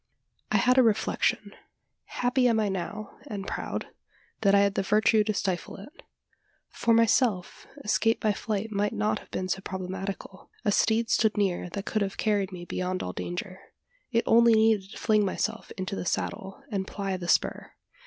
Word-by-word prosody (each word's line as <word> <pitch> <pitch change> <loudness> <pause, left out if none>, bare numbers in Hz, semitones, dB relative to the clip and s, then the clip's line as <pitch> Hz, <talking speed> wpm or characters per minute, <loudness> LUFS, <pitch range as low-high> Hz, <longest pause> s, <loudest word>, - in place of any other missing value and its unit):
I - - +4
had 255 +1 +4
a - - +8
reflection. 220 -3 +1 0.5
Happy 250 +1 +1
am 230 -2 +3
I 210 -2 +1
now, 195 +3 -5
and 200 -2 -5
proud, - - -4 0.5
that 200 -2 +4
I 200 - +6
had 200 -1 +2
the - - 0
virtue 215 +2 +3
to 215 - +1
stifle 185 -3 -2
it. 280 - -13 0.7
For 230 - 0
myself, 225 -4 +2 0.2
escape 225 +2 +2
by 215 -1 +1
flight 215 +1 -3
might 205 0 0
not 210 - 0
have - - -18
been 185 - -3
so 190 +1 -2
problematical. 190 +1 -6 0.2
A 205 - +3
steed 225 +2 +2
stood 220 -1 +2
near 185 -3 0
that 200 0 -4
could 215 - -1
have 195 -1 -2
carried 205 -3 0
me 175 -1 -8
beyond 185 +1 -3
all 90 - -4
danger. 90 - -5 0.5
It 230 -1 +2
only 235 0 +6
needed 220 -3 +3
to - - -10
fling 215 -2 +2
myself 220 +3 -2
into 185 +1 -3
the - - -4
saddle, 190 +3 -3
and 195 -2 -2
ply 195 -2 -3
the 180 -2 -6
spur. - - +1
205 Hz, 180 wpm, -27 LUFS, 190-220 Hz, 0.7 s, a